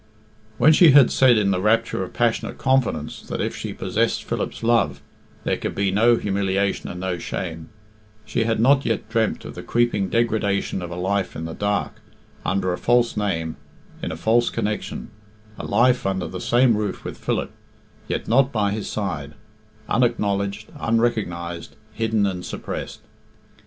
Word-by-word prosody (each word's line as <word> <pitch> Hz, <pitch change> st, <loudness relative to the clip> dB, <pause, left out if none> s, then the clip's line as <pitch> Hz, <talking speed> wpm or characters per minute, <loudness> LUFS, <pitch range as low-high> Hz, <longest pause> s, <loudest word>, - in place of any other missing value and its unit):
When 155 Hz, -, +6 dB
she 160 Hz, -2 st, +7 dB
had 140 Hz, -3 st, +7 dB
said 125 Hz, -3 st, +5 dB
in 100 Hz, -2 st, +2 dB
the 90 Hz, -1 st, 0 dB
rapture 115 Hz, -1 st, +1 dB
of 90 Hz, -, -7 dB
passionate 120 Hz, -1 st, 0 dB
confidence 125 Hz, -, 0 dB
that -, -, -5 dB
if -, -, -2 dB
she -, -, -5 dB
possessed -, -, -1 dB
Philip's -, -, -4 dB
love 115 Hz, 0 st, +2 dB, 0.4 s
there -, -, 0 dB
could -, -, -4 dB
be 100 Hz, -1 st, +1 dB
no 115 Hz, +4 st, +4 dB
humiliation 100 Hz, -2 st, -1 dB
and 90 Hz, -, -6 dB
no 90 Hz, -1 st, -2 dB
shame, 80 Hz, -3 st, -5 dB, 0.6 s
she 115 Hz, -, -1 dB
had 115 Hz, -1 st, 0 dB
not 135 Hz, +4 st, +4 dB
yet 115 Hz, -1 st, -1 dB
dreamt 115 Hz, -1 st, 0 dB
of -, -, -7 dB
the -, -, -7 dB
creeping 115 Hz, -5 st, +1 dB
degradation 105 Hz, -4 st, 0 dB
of 90 Hz, -, -5 dB
a 85 Hz, -, -6 dB
life 95 Hz, +2 st, -1 dB
in 80 Hz, -, -5 dB
the 80 Hz, -, -5 dB
dark, 100 Hz, +2 st, -2 dB, 0.4 s
under 95 Hz, 0 st, 0 dB
a -, -, -4 dB
false 120 Hz, 0 st, +2 dB
name, 80 Hz, -6 st, -2 dB, 0.4 s
in -, -, -3 dB
a 80 Hz, -, -5 dB
false 115 Hz, +7 st, +2 dB
connection: 105 Hz, -9 st, -3 dB, 0.5 s
a -, -, -5 dB
life 125 Hz, +4 st, +3 dB
under 95 Hz, -2 st, -1 dB
the 90 Hz, -, -6 dB
same 120 Hz, -1 st, +4 dB
roof 105 Hz, -1 st, -3 dB
with -, -, -7 dB
Philip, -, -, -2 dB, 0.6 s
yet -, -, -3 dB
not 135 Hz, +4 st, +3 dB
by 105 Hz, -3 st, +1 dB
his 105 Hz, -1 st, -3 dB
side, 75 Hz, -9 st, -3 dB, 0.5 s
unacknowledged, 105 Hz, -3 st, 0 dB
unrecognised, 90 Hz, -8 st, -1 dB, 0.2 s
hidden 110 Hz, -1 st, +1 dB
and 90 Hz, -2 st, -2 dB
suppressed. -, -, -6 dB
105 Hz, 165 wpm, -23 LUFS, 95-115 Hz, 0.6 s, she